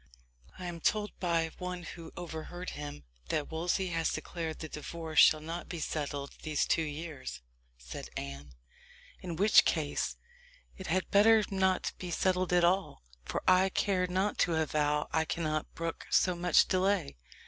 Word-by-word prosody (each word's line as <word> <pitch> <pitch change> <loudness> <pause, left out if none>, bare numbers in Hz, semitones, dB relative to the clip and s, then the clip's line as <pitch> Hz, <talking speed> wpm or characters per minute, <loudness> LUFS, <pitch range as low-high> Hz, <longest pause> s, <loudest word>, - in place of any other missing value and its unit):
"I 180 - -7
am 175 -1 -5
told 210 +3 +1
by 165 -2 +1
one 180 -1 -4
who 165 -1 -9
overheard 175 +1 -6
him, 145 - -7 0.3
that 150 0 -1
Wolsey 175 +3 0
has 165 -1 0
declared 165 -2 -4
the 160 - -6
divorce 155 +1 -3
shall 155 - +7
not 165 +3 -6
be 170 - -4
settled 145 -2 -3
these 155 -2 0
two 165 - +2
years," 150 - -6 0.3
said - - -8
Anne; 70 -1 -7 0.7
"in 175 -2 -5
which 205 +5 +6
case 155 -4 -1 0.6
it 190 - -8
had 185 +3 0
better 215 +2 +6
not 190 -1 +1
be 180 - -5
settled 185 +1 +1
at 175 -1 +4
all; 185 - +1 0.2
for - - -3
I 185 +1 +5
care 185 -1 +1
not 190 +3 0
to 170 - +3
avow 150 -1 +1
I 160 - +3
cannot 155 0 -2
brook 165 0 -4
so 180 - +4
much 175 -1 +4
delay. 185 - +1
170 Hz, 160 wpm, -31 LUFS, 155-185 Hz, 0.7 s, shall